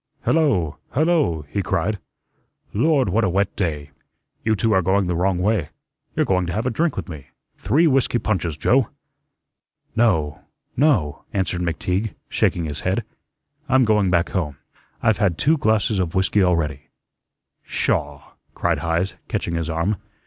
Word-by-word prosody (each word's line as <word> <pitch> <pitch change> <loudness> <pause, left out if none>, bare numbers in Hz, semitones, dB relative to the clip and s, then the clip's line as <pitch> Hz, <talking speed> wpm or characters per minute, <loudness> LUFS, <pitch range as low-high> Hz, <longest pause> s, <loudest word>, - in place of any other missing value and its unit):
"Hello, 95 - +2 0.2
hello," 150 - +2
he 100 +7 -2
cried. 100 +3 -1 0.7
"Lord, 135 +1 +2
what 110 +5 +2
a 95 - +2
wet 95 +2 0
day! 75 -6 -2 0.5
You 110 -1 +2
two 110 +2 +1
are 95 - +4
going 95 +2 +2
the 90 -1 -1
wrong 90 +2 +1
way. 95 -4 0 0.5
You're - - +2
going 90 -2 +1
to 85 - -3
have 110 +6 -2
a 130 - +1
drink 165 +7 0
with - - -4
me. 75 -6 -9 0.3
Three 150 +9 +2
whiskey 135 -5 +3
punches, 90 -9 -1
Joe." 130 - +3 1.1
"No, 80 -11 +2 0.4
no," 115 - +1
answered 90 -2 -1
McTeague, 90 +4 -1
shaking 85 - +1
his 75 -2 -4
head. 95 +9 -1 0.7
"I'm 130 -1 +5
going 105 -3 +3
back 85 -1 +2
home. 80 -7 -2 0.5
I've 110 -2 +3
had 90 -5 +2
two 155 +3 +3
glasses 110 -3 +2
of 85 -3 -1
whiskey 95 +2 +2
already." 80 -6 0 0.8
"Sha!" 75 -1 -1 0.3
cried 85 -3 0
Heise, 85 +4 -1
catching 85 - -2
his 85 -1 -2
arm. 85 +6 0
95 Hz, 155 wpm, -22 LUFS, 85-110 Hz, 1.1 s, I'm